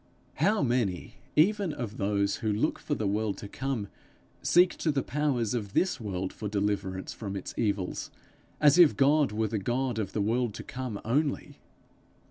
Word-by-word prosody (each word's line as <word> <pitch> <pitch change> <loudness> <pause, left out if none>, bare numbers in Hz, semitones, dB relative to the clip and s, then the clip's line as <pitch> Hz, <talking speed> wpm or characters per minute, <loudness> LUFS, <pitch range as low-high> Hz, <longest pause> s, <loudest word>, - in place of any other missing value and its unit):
How 195 +4 +2
many 120 -8 -1 0.2
even 195 +3 +3
of 120 -8 -5
those 100 0 0
who 110 -2 -1
look 110 +9 0
for 145 - -2
the 110 - -2
world 105 +1 0
to 100 - -7
come, 130 -2 -3 0.5
seek 175 +1 +4
to 160 - +1
the 140 -2 0
powers 135 -7 0
of 105 -5 -3
this 180 -6 +1
world 95 -3 -3
for 105 - -5
deliverance 100 -2 -2
from 100 -3 -6
its 95 - -5
evils, 100 -4 -1 0.5
as 150 +2 +5
if 170 -4 +7
God 145 0 +4
were 110 +1 0
the 105 - -1
God 120 +2 -1
of 100 -3 -3
the - - -1
world 115 +1 0
to - - -7
come 125 -5 -5
only! 140 +5 -1
115 Hz, 175 wpm, -29 LUFS, 100-145 Hz, 0.5 s, if